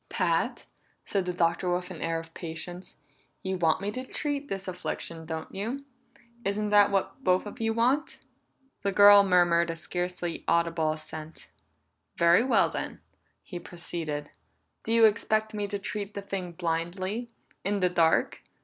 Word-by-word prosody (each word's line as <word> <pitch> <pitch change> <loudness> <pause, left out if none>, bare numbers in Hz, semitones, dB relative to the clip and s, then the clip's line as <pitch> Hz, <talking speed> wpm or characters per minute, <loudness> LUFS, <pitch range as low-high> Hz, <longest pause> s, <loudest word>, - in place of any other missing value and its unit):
"Pat," - - 0 0.4
said 195 -2 -1
the - - +1
Doctor 170 +1 +1
with 180 +1 -2
an 165 - -8
air 165 0 0
of 165 0 -12
patience, 175 +2 -6 0.5
"you 190 0 -1
want 165 -1 +2
me 200 +1 -2
to 255 +4 -4
treat 285 +2 -3
this 195 -4 -4
affliction, 170 -2 -5
don't 160 -1 -5
you? 235 +8 -4 0.6
Isn't 210 +1 -1
that 205 -1 +6
what 200 +7 -1
both 185 +2 +3
of 205 - -8
you 225 0 +1
want?" 260 +7 +1 0.6
The 200 - 0
girl 205 +1 +9
murmured 175 -3 +3
a 165 - -2
scarcely 175 +1 -4
audible 165 -1 +2
assent. 155 0 -7 0.7
"Very 170 +5 +5
well, 260 - +4
then," - - -5 0.4
he 175 - -7
proceeded. 160 -4 -5 0.5
"Do 225 - -4
you 230 0 +7
expect 215 0 +2
me 205 -1 -2
to 205 0 -3
treat 205 +1 -5
the 200 - -3
thing 185 -3 -4
blindly 185 +7 -2 0.3
in 200 +1 0
the 180 -1 +3
dark? 165 -2 +2
185 Hz, 160 wpm, -28 LUFS, 170-205 Hz, 0.7 s, girl